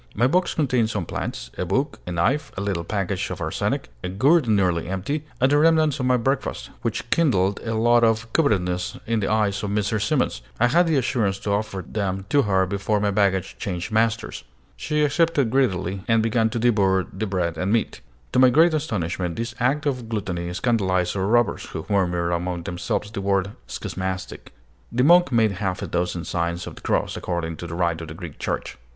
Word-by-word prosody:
My 120 - +3
box 175 +8 +2
contained 125 -7 +1
some 105 -6 -2
plants, - - -5
a - - +1
book, 135 - -1
a - - -3
knife, 135 - 0
a - - -2
little 95 -4 -1
package 100 0 -2
of - - -5
arsenic, - - -2
a - - -2
gourd 135 - +3
nearly 90 -6 +2
empty, 105 - -3
and 130 +2 +3
the 145 - +5
remnants 155 -2 +3
of 125 - 0
my 125 0 +4
breakfast, 135 +3 -2
which - - -3
kindled 100 - +2
a 115 -1 -2
look 120 +1 +4
of 115 0 +1
covetousness 90 - +1
in 115 -1 0
the 95 - -1
eyes 105 -2 +1
of 105 - -3
Mrs. 105 +1 0
Simons. 100 - 0 0.2
I 120 +2 +4
had 175 +5 +4
the 160 - +2
assurance 110 -6 0
to 100 - -2
offer 100 -3 -2
them 95 -2 -2
to 145 +2 +4
her 95 -5 +2
before 100 +2 -1
my 100 0 +1
baggage 95 -2 0
changed 90 -1 -4
masters. 115 +1 0 0.3
She 150 -1 0
accepted 150 -4 +2
greedily, 100 -8 0
and 115 -1 +3
began 115 0 +2
to 115 - -3
devour 100 -5 +3
the 105 +3 -3
bread 90 -3 -1
and 95 +2 0
meat. 115 0 0 0.3
To - - +2
my 130 0 +7
great 160 +6 +5
astonishment, 90 - -2
this 115 +1 -4
act 135 +5 +1
of 125 -5 -2
gluttony 90 -5 -3
scandalized 95 -4 +1
our 95 0 0
robbers, 120 +1 +2
who 80 - -7
murmured 90 -4 +1
among 85 0 -2
themselves 90 +4 -3
the 100 - -4
word 100 0 +1 0.2
"Schismatic:" 95 0 -5 0.4
The 125 +2 +1
monk 175 0 +6
made 115 -3 +3
half 95 -3 -2
a - - -1
dozen 90 -1 -2
signs 85 0 -2
of - - -7
the - - -13
cross, - - 0
according 85 -2 -3
to 85 - -6
the 85 - -6
rite 85 -2 0
of 80 - -7
the 80 - -8
Greek 80 -3 -9
Church. - - -3
105 Hz, 200 wpm, -23 LUFS, 90-120 Hz, 0.4 s, my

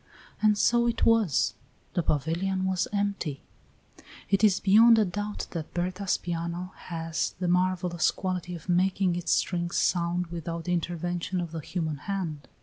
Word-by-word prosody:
And 210 -1 +4
so 235 +2 +3
it 235 -1 +1
was; 225 - +3 0.4
the 180 - +1
pavilion 170 +6 0
was 190 -1 0
empty. 200 -8 -2 0.9
It 195 +1 +3
is 200 -3 +5
beyond 225 +4 +6
a 215 - +4
doubt 205 +3 -4
that 165 -3 -6
Berta's 185 +2 0
piano 170 +1 -4
has 165 -1 -3
the 180 - -1
marvellous 180 -1 +2
quality 180 -2 -3
of 165 - -11
making 185 0 +2
its 175 -1 -2
strings 175 -1 0
sound 175 0 +1
without 170 0 -4
the 180 - -1
intervention 175 +1 -2
of 170 -2 -4
the 165 - -4
human 160 -1 -3
hand. 160 -5 -4
180 Hz, 150 wpm, -27 LUFS, 170-195 Hz, 0.9 s, beyond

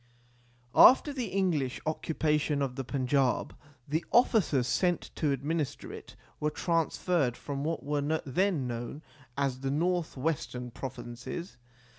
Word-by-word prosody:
After 285 +3 +7
the 255 -4 -2
English 175 -10 0
occupation 150 -2 0
of 130 -2 -3
the 135 - -3
Panjab 130 0 +1 0.4
the 155 +4 0
officers 210 - +4
sent 175 +7 0
to 150 -3 0
administer 145 +2 -2
it - - -10 0.2
were 150 - +1
transferred 165 -4 0
from 140 -1 -4
what 160 +2 -2
were 145 0 0 0.2
then 165 +1 +1
known 120 +5 -5 0.3
as 135 -2 0
the 135 0 -2
North 170 +2 0
Western 130 -4 -2
Provinces. 125 +6 -7
150 Hz, 125 wpm, -30 LUFS, 130-170 Hz, 0.4 s, After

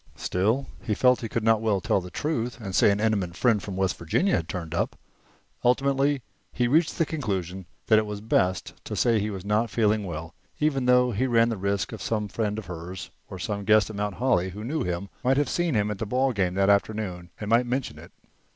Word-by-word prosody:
Still, 110 +9 0 0.2
he 105 - -1
felt 125 +2 +4
that - - -5
he - - -5
could 115 - -2
not 110 -1 +3
well 110 -3 +1
tell 95 - +1
the 90 - -8
truth 125 - -2
and 100 -4 -6
say - - +5
an 100 0 +1
intimate 100 -5 0
friend 115 -5 +3
from 100 - -6
West 95 -1 +1
Virginia 130 - +1
had 80 -1 -2
turned 85 -3 -5
up. 85 - -1 0.7
Ultimately, 135 +2 +2 0.3
he 120 - 0
reached 155 +6 +2
the 165 - +2
conclusion 95 - -3 0.2
that 110 -1 +5
it 110 - -2
was 105 -1 -5
best 95 -4 0
to - - -4
say 115 -2 +3
he 105 +1 -1
was 95 -2 -6
not 105 +3 +1
feeling 110 -2 +1
well, 80 -2 -6 0.3
even 135 -4 +1
though 125 0 +5
he 120 +5 0
ran 115 -1 +4
the 115 - -1
risk 100 0 -1
that 110 -4 -7
some 105 +1 -1
friend 105 0 -2
of 110 - -5
hers, 90 +2 -7 0.2
or 95 - -7
some 100 +2 -3
guest 105 +1 +4
at - - -9
Mount 105 -1 -2
Holly 115 -7 +1
who 105 +4 -8
knew 150 +7 -2
him, 90 +2 -2 0.2
might 130 +2 +3
have 145 - +2
seen 175 -6 0
him 105 0 +1
at 100 - -5
the 110 - -3
ball 130 +3 +1
game 95 -4 0
that 95 0 +2
afternoon 100 -3 0
and 105 0 -4
might 120 +1 +4
mention 130 +2 -2
it. - - -13
105 Hz, 235 wpm, -26 LUFS, 95-125 Hz, 0.7 s, say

